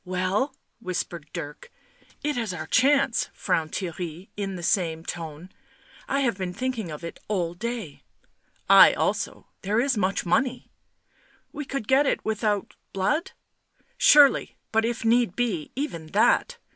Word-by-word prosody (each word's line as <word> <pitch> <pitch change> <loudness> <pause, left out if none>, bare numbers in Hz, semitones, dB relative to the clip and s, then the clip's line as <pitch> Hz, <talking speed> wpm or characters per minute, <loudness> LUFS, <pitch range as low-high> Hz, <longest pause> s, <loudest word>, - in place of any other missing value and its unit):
"Well?" 185 +8 -1 0.2
whispered 175 -6 -4
Dirk. 150 - -7 0.5
"It 295 0 0
is 225 -6 -2
our 155 -2 -5
chance," 270 - +3
frowned 160 -1 -1
Theirry 175 -1 -5
in 195 -2 -3
the 175 - -7
same 165 -3 0
tone. 165 +1 -7 0.3
" - - -28 0.2
I 275 +1 +1
have 235 -7 0
been 180 -1 -3
thinking 250 -7 -3
of 150 +1 -8
it 170 - -7
all 180 -5 -1
day 225 -5 -5 0.2
" - - -41
' - - -39
1 - - +6
I - - +9
also; - - -2 0.2
there 210 +4 0
is 265 -1 +1
much 195 -1 0
money. 255 +7 0 0.4
..." - - -35
"We 295 - -5
could 270 -6 -4
get 275 +2 +4
it - - -1
without... 210 -2 -1 0.2
blood?" 300 - 0 0.4
" - - -50 0.2
Surely, 290 -2 +5
but 225 0 +2
if 235 -1 -3
need 230 -4 +3
be 210 -11 -1
even 170 - -4
that." 240 - +3
205 Hz, 165 wpm, -25 LUFS, 175-250 Hz, 0.5 s, I